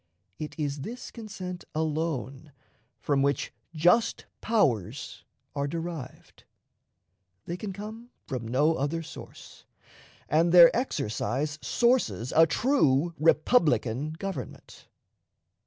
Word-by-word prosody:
It 155 - -6
is 145 -2 -2
this 245 - -7
consent 185 -6 -7
alone 155 -3 -2 0.5
from 140 -2 +1
which 140 -1 0 0.2
"just 180 +9 +3 0.2
powers" 135 - 0 0.3
are 140 0 -1
derived. 165 -3 -7 1.0
They 170 - -4
can 195 +2 -5
come 215 +5 -8 0.2
from 125 -5 -4
no 145 +7 +3
other 155 +4 -1
source, - - -12 0.6
and 165 +3 +3
their 170 -1 +9
exercise 150 - -2
sources 240 - +1
a 165 0 +7
true 170 - +2
republican 155 - +2
government. 195 +4 -7
160 Hz, 100 wpm, -28 LUFS, 140-185 Hz, 1.0 s, their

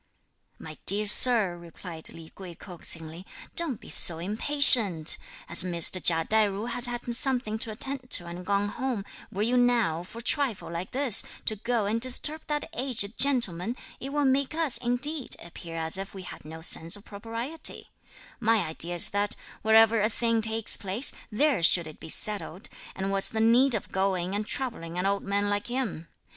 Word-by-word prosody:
"My 155 -1 -11
dear 205 +2 +2
sir," 210 -3 +6
replied 170 -1 -4
Li 165 -1 -13
Kuei 185 -3 -11
coaxingly, 165 -2 -4 0.3
"don't 315 -10 -2
be - - -15
so 170 - +8
impatient! 210 - +5 0.3
As 170 - +6
Mr. 180 0 +2
Chia 165 -1 +3
Tai 220 -1 +1
ju 200 +2 -6
has 245 +1 +2
had 240 0 -6
something 245 -5 -3
to 225 - -2
attend 255 +4 -5
to 175 - +3
and 175 +1 -9
gone 200 +2 -1
home, 240 -3 -5 0.3
were 200 +2 -3
you 245 +3 0
now, 235 -10 0
for 180 +6 -14
a 230 - -8
trifle 255 - -2
like 170 +2 -6
this, 260 -5 +1 0.2
to 215 - -2
go 230 +1 -3
and 220 +3 -2
disturb 295 +5 +2
that 295 -1 -4
aged 240 -7 -2
gentleman, 235 -6 +1 0.2
it 270 - -7
will 290 0 -1
make 270 +2 -1
us, 320 -6 +3
indeed, 255 +4 +1
appear 170 -1 -11
as 160 +3 -3
if 195 +1 -8
we 190 - -9
had 180 - -12
no 160 +1 -11
sense 165 +1 +1
of 205 - -13
propriety: 230 +9 -2 0.5
my 225 -1 +1
idea 170 +2 -6
is 175 - +5
that 205 0 -2 0.3
wherever 220 0 +3
a 215 - 0
thing 230 0 -2
takes 220 0 0
place, 205 +7 0 0.2
there 270 - 0
should 170 0 +5
it 155 -1 -12
be - - -11
settled; 200 -1 -6 0.3
and 190 +1 -4
what's 195 0 +3
the 220 - -5
need 240 +3 +3
of 210 - -6
going 190 -1 -2
and 210 +1 -4
troubling 225 -11 -4
an 180 - -3
old 200 0 -1
man 200 +1 -2
like 205 0 -3
him. 240 -10 -5
210 Hz, 185 wpm, -26 LUFS, 180-245 Hz, 0.5 s, so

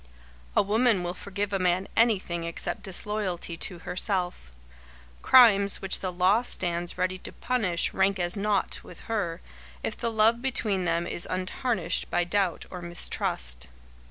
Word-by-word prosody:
A - - +5
woman 215 -1 +3
will 175 0 -2
forgive 200 +2 -4
a 195 - +1
man 185 +1 +1
anything 195 -7 +2
except 170 0 -2
disloyalty 190 -3 -2
to 180 +1 -4
herself. 180 - -2 0.7
Crimes 200 -6 +6
which 195 - 0
the 185 - -3
law 185 +5 +3
stands 175 -7 -2
ready 185 0 -1
to - - -8
punish 205 -9 0
rank 195 0 +2
as 175 -1 0
naught 205 -1 0
with 175 - -12
her, 195 -7 -3 0.4
if - - -2
the 235 - -2
love 225 +1 +3
between 215 -8 0
them 170 0 0
is 175 - -2
untarnished 185 -1 -1
by 175 - +1
doubt 180 -1 0
or 180 - -6
mistrust. 65 - -2
185 Hz, 150 wpm, -27 LUFS, 175-210 Hz, 0.7 s, Crimes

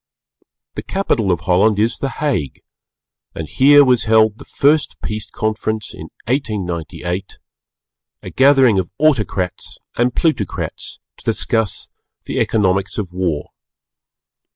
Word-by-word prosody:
The - - -5
capital 115 - 0
of 85 -1 -1
Holland 95 +4 +3
is 115 +3 0
the 135 - -2
Hague, 135 - -3 0.7
and 80 - -5
here 145 - +6
was 125 -3 +2
held 110 -1 +3
the - - -11
first 150 +2 +1
Peace 105 0 -4
Conference 110 0 -3
(in - - -10 0.2
1898), 90 - -3 0.9
a - - -6
gathering 130 -6 +5
of 90 - -3
Autocrats 110 - 0 0.2
and 120 0 +1
Plutocrats 155 - -2 0.2
to - - -18
discuss 110 -3 -1 0.3
the - - -3
Economics 95 -2 +1
of 95 -5 -4
War. 90 -5 -2
110 Hz, 120 wpm, -18 LUFS, 95-130 Hz, 0.9 s, here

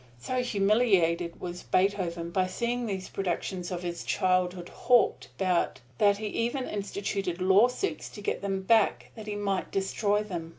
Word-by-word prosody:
So 255 - -2
humiliated 195 -7 +2
was 175 0 -6
Beethoven 180 -3 0
by 185 +1 +1
seeing 235 +5 -2
these 190 -3 -3
productions 180 -1 -3
of 180 -1 -4
his 170 -1 -4
childhood 185 -2 0
hawked 245 -2 +2
about 180 -8 +1 0.2
that 205 -1 +4
he 215 - -5
even 240 +5 -1
instituted 200 -3 -3
lawsuits 215 - +2
to 205 - -10
get - - -2
them 195 -1 -2
back 220 +1 +2
that 220 -2 -10
he 210 - -3
might 200 -2 -1
destroy 205 +2 0
them. 175 -6 -5
195 Hz, 155 wpm, -28 LUFS, 180-210 Hz, 0.2 s, that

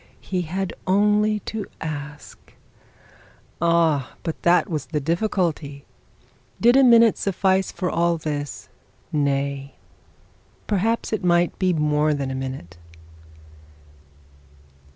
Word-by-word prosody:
He 185 -2 -3
had 185 +3 -3
only 210 +2 +2
to 215 0 -5
ask. 150 -2 -8 1.1
Ah! 165 -5 +2
but 165 -2 -4
that 175 +4 +3
was 155 -7 -4
the 150 +3 -2
difficulty. 165 -4 -2 0.7
Did 240 +2 +5
a 270 - +6
minute 235 -3 +6
suffice 190 0 +1
for 185 - -3
all 170 0 +1
this? 145 -3 -5 0.4
Nay, 140 -1 -1 0.9
perhaps 220 +3 0
it 215 - -2
might 175 -1 +2
be 185 -1 +2
more 150 -1 +1
than 135 -2 -3
a - - -3
minute. 130 -10 -6
170 Hz, 110 wpm, -23 LUFS, 145-195 Hz, 1.1 s, a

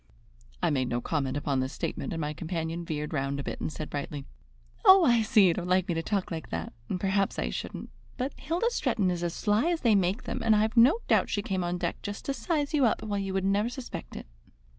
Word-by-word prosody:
I 170 - +3
made 130 -3 +1
no 120 - 0
comment 135 0 -1
upon 140 -2 0
this 130 +3 -2
statement, - - -4
and 165 - -3
my 150 -1 -2
companion 165 +1 -3
veered 150 -1 -4
round 140 -1 -1
a - - -3
bit - - -5
and - - -2
said 155 0 -5
brightly: 145 -1 -4 0.6
"Oh, 380 -4 +8
I 235 -4 +4
see 215 -2 +5
you 175 - +4
don't 175 +1 -4
like 185 0 +2
me 175 - 0
to 165 - -1
talk 195 +1 -2
like 160 -1 -5
that, 85 +5 -4 0.2
and 185 - -2
perhaps 195 +1 0
I - - -1
shouldn't, - - -6 0.3
but 260 +3 -2
Hilda 355 +9 -1
Stretton 220 - +1
is 175 -1 -3
as 170 -1 -2
sly 215 +10 +2
as 340 -2 0
they 230 -4 +4
make 195 +3 +1
them, - - -4
and 225 -1 +5
I've 215 +2 +1
no 260 - +6
doubt - - +3
she 205 - -1
came 190 -2 -1
on 175 +1 -1
deck 175 -1 -3
just 205 0 -6
to 275 - -1
size 290 +4 -1
you 290 -3 +3
up, - - -1
while 205 -2 -2
you 195 -1 -3
would 190 0 0
never 200 +4 +2
suspect 250 0 -7
it." - - -7
190 Hz, 250 wpm, -28 LUFS, 160-225 Hz, 0.6 s, Oh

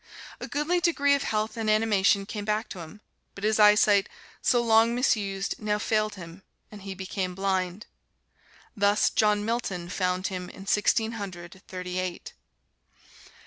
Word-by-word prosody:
A - - -6
goodly 300 +5 0
degree 300 -5 +2
of 280 - +1
health 215 -2 -2
and 225 -2 -2
animation 205 -2 +3
came 210 +1 -5
back 215 +2 -1
to 185 - -8
him, 170 +6 -10 0.3
but 200 - -10
his 215 +1 +1
eyesight, 210 -1 +5 0.3
so 245 - +3
long 230 0 +4
misused, 200 -6 0
now 210 -1 0
failed 215 0 0
him 170 0 -11 0.3
and 210 -1 -11
he 195 0 -7
became 185 -1 -4
blind. 190 0 -2 0.9
Thus 205 0 +3
John 210 -1 +2
Milton 200 -7 -3
found 185 0 -1
him 180 -2 -4
in 195 - -11
Sixteen 220 +2 +2
Hundred 180 -1 -8
Thirty 180 0 -5
eight. 185 -1 -5
205 Hz, 150 wpm, -27 LUFS, 190-220 Hz, 0.9 s, eyesight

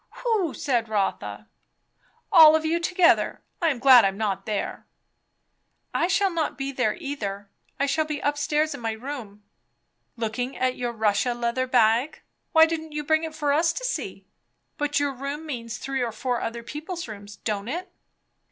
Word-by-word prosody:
"Who?" 425 - +1
said 240 -7 0
Rotha. 205 -3 -2 0.8
"All 320 -5 +9
of 315 0 0
you 330 +2 +1
together. 355 0 +2 0.2
I 335 - +3
am 295 -5 +1
glad 250 -1 +8
I'm 195 0 +1
not 210 -2 -2
there." 210 -2 -3 1.1
"I 340 - +2
shall 390 +1 +2
not 330 -3 -2
be 275 0 -3
there 250 -5 0
either. 205 - -5 0.3
I 280 - +3
shall 310 +3 +1
be 300 -1 -4
up 290 0 +1
stairs 300 +1 0
in 280 - -7
my 225 -1 -1
room." 220 -4 -8 0.7
"Looking 235 +3 -3
at 255 0 0
your 245 -1 -3
Russia 220 +2 +1
leather 240 +2 -1
bag. 245 +4 +2 0.3
Why 320 0 +7
didn't 320 -1 -4
you 300 0 -3
bring 315 +2 +2
it 320 -1 -5
for 295 -2 +1
us 325 +3 +3
to - - -5
see? - - -4 0.5
But 290 -1 +1
your 285 -1 0
room 280 +4 -5
means 230 -6 -5
three 270 +1 -3
or 240 -2 -1
four 245 +2 -2
other 235 +1 -4
people's 320 +6 -6
room, 205 -2 -9 0.2
don't 210 -1 -2
it?" 355 +7 -4
275 Hz, 175 wpm, -25 LUFS, 230-315 Hz, 1.1 s, All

